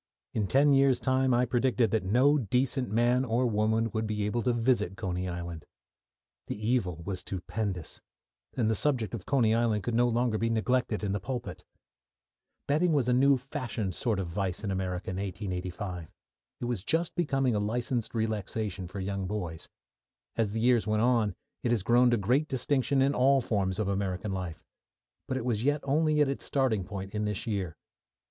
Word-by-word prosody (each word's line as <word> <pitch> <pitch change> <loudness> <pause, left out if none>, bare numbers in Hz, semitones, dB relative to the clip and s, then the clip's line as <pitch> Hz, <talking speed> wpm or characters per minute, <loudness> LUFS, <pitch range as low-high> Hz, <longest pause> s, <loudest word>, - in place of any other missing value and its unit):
In 105 -3 0
ten 140 +6 +4
years' 135 -2 +4
time 130 0 +2
I 120 +1 +3
predicted 120 -2 +1
that 110 - +2
no 130 +10 +4
decent 125 +1 0
man 120 +4 +2
or 125 0 +1
woman 110 0 +1
would 110 +1 -2
be 105 -1 -1
able 120 +3 0
to 125 - +1
visit 115 -5 +1
Coney 90 0 -2
Island. 85 -2 -6 0.8
The - - -4
evil 105 -7 0
was 95 -1 -3
stupendous, 95 -2 -4 0.6
and 115 -4 +2
the 110 - +2
subject 120 -1 0
of 105 -6 -6
Coney 120 -6 +3
Island 115 -3 +1
could 120 - -2
no 120 +1 +4
longer 120 -2 +1
be 115 - +1
neglected 115 -1 0
in 100 - 0
the 100 - -1
pulpit. 120 +2 -5 1.0
Betting 160 +4 +2
was 135 -5 +2
a 125 - +3
new 135 +2 +5
fashioned 120 -6 -4
sort 110 +1 0
of 95 - -1
vice 95 +2 -3
in 100 - -2
America 95 -1 -3
in 90 - -4
1885; 95 -2 -4 0.5
it - - -3
was 120 -6 -2
just 165 +7 0
becoming 135 -7 +1
a 105 - +1
licensed 120 +3 -2
relaxation 105 -3 -2
for 100 +3 -7
young 95 0 -3
boys. 90 -5 -5 0.7
As 110 -3 +1
the 110 +2 -3
years 120 -2 +3
went 110 +1 +2
on, 115 -6 +2 0.3
it - - -1
has 115 -5 +1
grown 120 +3 +5
to 120 - +3
great 125 +10 +1
distinction 135 +1 +1
in 140 +1 +2
all 135 +1 +4
forms 100 -6 -1
of 105 -2 -1
American 100 0 -2
life, 90 -4 -5 0.6
but 130 - -1
it 125 - -4
was 115 -3 0
yet 145 +2 +1
only 150 +2 +2
at 145 - +4
its 135 - -3
starting 125 -9 +1
point 95 0 -6
in 105 0 -1
this 105 -2 -2
year. 95 -7 -3
110 Hz, 185 wpm, -29 LUFS, 100-125 Hz, 1.0 s, new